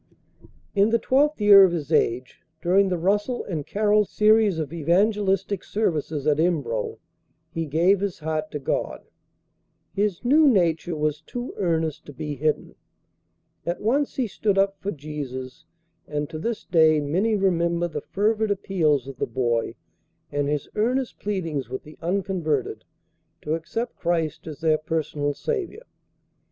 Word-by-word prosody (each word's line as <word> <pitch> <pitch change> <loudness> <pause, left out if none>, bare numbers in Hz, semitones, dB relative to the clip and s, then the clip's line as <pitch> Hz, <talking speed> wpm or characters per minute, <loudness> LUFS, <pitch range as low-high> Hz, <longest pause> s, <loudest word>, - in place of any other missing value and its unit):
In 200 +1 +4
the 230 - +3
twelfth 280 +6 +2
year 205 -1 +9
of 185 - +5
his 155 -3 -4
age, 125 -2 0 0.2
during 190 +4 +3
the 180 - 0
Russell 205 +8 0
and 155 -6 -4
Carroll 210 0 +3
series 215 -2 +3
of 155 0 -4
evangelistic 195 +3 +1
services 155 -8 -1
at 150 -1 +2
Embro, 140 -11 0 0.5
he 165 -1 -3
gave 175 +7 +3
his 200 -2 -2
heart 155 0 -3
to 150 - -4
God. 140 - -3 0.9
His 205 +1 -1
new 300 +5 +5
nature 175 - +2
was 150 0 -1
too 245 +9 -6
earnest 160 -4 -1
to 145 - -9
be 150 +3 -5
hidden. 155 +3 -1 0.9
At 170 +1 -3
once 270 +7 0
he 260 - 0
stood 205 -1 -1
up 195 0 +3
for 200 - -4
Jesus, 140 -5 -6 0.4
and 150 0 -2
to 155 - -5
this 230 +6 -3
day 160 -2 +4
many 185 +10 +1
remember 170 -3 +1
the 170 - -5
fervid 215 +2 0
appeals 160 -9 +1
of 135 -2 -8
the - - -1
boy, 120 -1 -1 0.6
and 145 0 -1
his 150 -1 -2
earnest 250 +4 -1
pleadings 165 -10 -3
with 130 - -5
the 150 - -14
unconverted 165 - -1 0.6
to 150 - -1
accept 225 +9 -4
Christ 165 -3 -1
as 155 -2 -8
their 155 -1 +3
personal 150 -2 -2
Saviour. 445 0 -3
170 Hz, 150 wpm, -24 LUFS, 150-205 Hz, 0.9 s, year